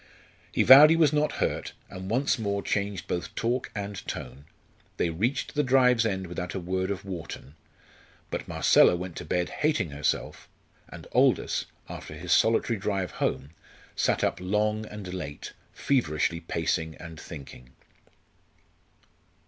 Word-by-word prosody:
He - - +2
vowed 140 +3 +10
he 165 - +5
was 155 -3 +4
not 150 0 +1
hurt, - - -2
and 95 +1 -8
once 130 +3 +1
more 100 -2 -1
changed 100 -2 -2
both 85 - -4
talk 120 +2 -1
and 100 -1 -4
tone. 65 +3 -6 0.5
They 85 - 0
reached 110 +12 -1
the 150 - +2
drive's 125 -4 +4
end 95 -3 -2
without 90 +1 -5
a - - -1
word 95 +1 -2
of 100 0 -4
Wharton. 85 -6 -7 0.8
But - - -4
Marcella - - +5
went 90 0 -6
to - - -6
bed 90 +3 -1
hating 150 - 0
herself, 70 +1 -2 0.4
and - - -10
Aldous, - - +2 0.2
after 75 - -8
his 85 +2 -6
solitary 115 +1 +3
drive 95 -3 -2
home, 70 +3 -2 0.4
sat - - +1
up - - 0
long 105 +3 0
and 100 -4 -8
late, 80 -6 -6 0.2
feverishly 85 - 0
pacing 80 -1 -2
and 80 -2 -10
thinking. 70 -4 -10
95 Hz, 145 wpm, -27 LUFS, 85-115 Hz, 0.8 s, vowed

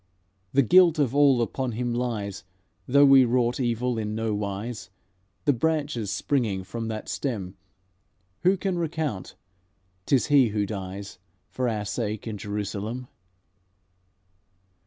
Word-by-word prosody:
The 140 - +4
guilt 175 - +6
of 140 -5 +1
all 140 -4 +5
upon 125 +1 -3
Him 120 +1 -2
lies, 110 -6 -3 0.4
Though 140 +1 +6
He 135 -1 +8
wrought 120 0 +1
evil 120 -1 0
in 105 0 -3
no 110 -1 -1
wise. 105 +3 -4 0.6
The 145 - +4
branches 145 -5 -1
springing 105 -2 -1
from 115 +4 -5
that 110 -1 -5
stem 100 -9 -3 0.8
Who 185 +7 +3
can 185 -2 -2
recount? 155 - -3 0.7
'T - - +4
is 130 - +2
He 140 -4 +5
who 105 -1 -1
dies 100 0 -6 0.3
For 130 -1 -1
our 105 -2 -2
sake 105 +1 -3
in 110 -3 -5
Jerusalem.'" 105 +4 -4
120 Hz, 135 wpm, -26 LUFS, 105-135 Hz, 0.8 s, He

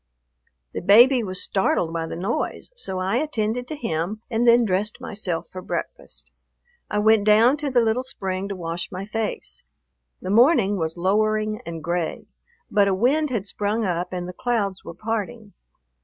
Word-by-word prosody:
The - - -3
baby 240 +7 +6
was 185 -4 -3
startled 175 -4 0
by 165 -1 -2
the - - -5
noise, 200 - -3
so 190 - -1
I 190 +5 0
attended 245 -4 -1
to 310 - -5
him 210 - -3
and 235 +1 +1
then 235 0 +6
dressed 205 +2 -1
myself 180 -6 -2
for 185 - -7
breakfast. - - -5 0.6
I 210 - -1
went 215 0 +4
down 220 +5 +5
to 295 -1 -2
the 250 -2 +3
little 225 +2 +1
spring 195 -6 -4
to 200 - -3
wash 170 -1 -5
my 185 +1 -5
face. 225 - -4 0.6
The 185 - -4
morning 220 - +4
was 160 -1 -2
lowering 215 +4 +1
and 165 -2 -6
gray, 170 0 -2 0.5
but 205 -1 +4
a 195 - +2
wind 280 +9 +2
had 225 -6 -2
sprung 210 +2 -1
up 175 -1 -2
and 180 -1 -4
the 180 - -7
clouds 205 -4 -1
were 170 - -9
parting. 220 +1 -4
210 Hz, 170 wpm, -23 LUFS, 185-235 Hz, 0.6 s, baby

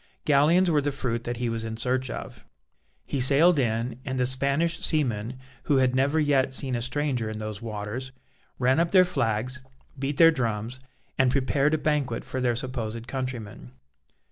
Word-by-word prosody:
Galleons 155 +6 +4
were 150 -2 +3
the 145 +1 -1
fruit 120 -4 -3
that 120 0 -3
he 120 0 -2
was 115 -1 -2
in 110 0 -5
search 130 +2 -1
of. - - -7 0.6
He 140 - -2
sailed 145 +5 +5
in, 115 0 -1
and 130 -2 -4
the 125 - +2
Spanish 140 +6 0
seamen, 125 -5 0 0.3
who 145 - +3
had 130 -1 +3
never 140 +4 +2
yet 140 -3 +2
seen 130 0 0
a 120 - -1
stranger 130 -2 -1
in 110 - -5
those 110 -1 -6
waters, 110 +4 -5 0.5
ran 130 +3 +2
up 170 0 +2
their 185 0 +6
flags, 125 -5 -1 0.4
beat 135 +1 -2
their 165 0 +8
drums, 120 -3 -3 0.4
and 130 -1 +4
prepared 140 +3 +1
a - - 0
banquet 150 -3 -1
for 130 - -4
their 120 -2 +1
supposed 115 -2 -4
countrymen. 120 - -6
130 Hz, 175 wpm, -26 LUFS, 115-145 Hz, 0.6 s, their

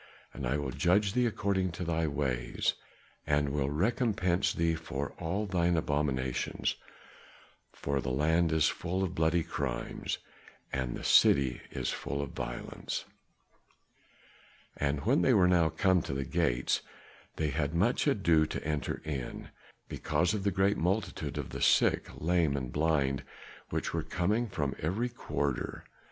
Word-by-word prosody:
And 65 - -4
I 70 +5 +1
will 75 - -3
judge 100 +3 +2
thee 125 0 +3
according 100 -4 0
to 90 - -4
thy 80 -1 0
ways, 70 -5 0 0.5
and 75 -1 +2
will 70 -1 0
recompense 95 - +1
thee 85 0 +1
for 75 -3 -4
all 95 +5 -1
thine 90 -3 +1
abominations, 70 -5 -1 1.0
for 70 -1 -2
the - - -3
land 80 +5 +2
is 80 -1 +4
full 90 +2 -1
of 90 -2 -2
bloody 80 0 +2
crimes, - - -3 0.6
and 65 -2 -1
the - - -8
city 65 -3 +5
is - - -2
full 70 - -3
of 70 -2 -3
violence." - - -5 1.7
And 70 -1 -1
when - - +4
they - - +4
were 90 - +5
now 85 -3 +4
come 95 -1 +3
to 70 - -4
the 70 0 -2
gates, 70 -7 +1 0.5
they 80 -1 0
had 70 +2 -1
much 115 - +2
ado 85 - +3
to - - -4
enter 75 -1 -2
in, 70 -5 -5 0.4
because 85 +5 0
of 105 - -1
the 100 - +3
great 95 +2 +2
multitude 95 +6 -1
of - - -4
the - - -5
sick, - - +4
lame 80 -3 +1
and 65 -2 -4
blind 75 -4 +1 0.5
which - - -2
were - - 0
coming 105 +7 0
from 70 -7 -2
every 100 +10 -1
quarter. 70 - -3
80 Hz, 150 wpm, -31 LUFS, 70-90 Hz, 1.7 s, city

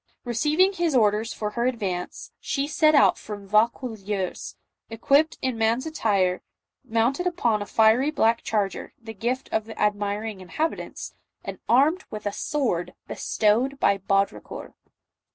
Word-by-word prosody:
Receiving 300 - +2
his 340 -5 0
orders 215 -1 +2
for 210 -1 -4
her 235 +2 0
ad 255 -2 -1
vance, 180 -4 -4
she 275 0 -2
set 310 +1 +3
out 285 - +5
from 205 -2 -8
Vaucouleurs, 210 -3 -1 0.3
equipped 275 +7 +2
in 255 -3 -1
man's 230 +4 +1
attire, 200 -12 0 0.4
mounted 240 +10 0
upon 240 -12 0
a 205 - -5
fiery 225 +7 +4
black 230 -6 +2
charger, 205 -3 -2
the 225 -1 -9
gift 240 +5 -2
of 220 -1 0
the 225 - -10
admiring 205 0 -1
inhabitants, 305 - -4 0.3
and - - -6
armed 305 +10 +4
with 210 -1 -7
a 205 - 0
sword 200 - -2
bestowed 240 +6 0
by 200 -6 +3
Baudricourt. 195 +1 -2
225 Hz, 140 wpm, -25 LUFS, 205-275 Hz, 0.4 s, out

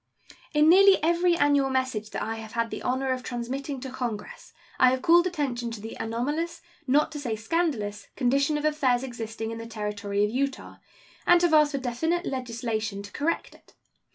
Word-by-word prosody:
In 300 +1 +5
nearly 385 +3 +7
every 345 +1 +3
annual 285 -3 +3
message 260 -5 -1
that - - -4
I 225 +1 -3
have 220 0 -9
had 230 -1 -1
the - - -5
honor 260 +1 -1
of 255 0 -1
transmitting 260 +3 -4
to 265 -1 -6
Congress 240 -5 -5 0.3
I 255 - +7
have 255 0 -1
called 345 +2 +5
attention 265 -9 -2
to 230 -2 -7
the 220 +2 -7
anomalous, 295 +10 -2 0.3
not 290 +4 +3
to 300 - -6
say 240 -6 -2
scandalous, 220 -5 -2
condition 275 +4 +2
of 295 - -3
affairs 265 -5 +2
existing 225 -3 -5
in 230 - -6
the 230 - -7
Territory 210 -2 -2
of 210 - -3
Utah, 275 +2 -3 0.5
and 350 0 +7
have 345 -2 +3
asked 300 -1 +5
for - - 0
definite 320 +8 -1
legislation 225 -5 -3
to 200 - -10
correct 315 +4 -2
it. - - -22
260 Hz, 185 wpm, -26 LUFS, 225-300 Hz, 0.5 s, nearly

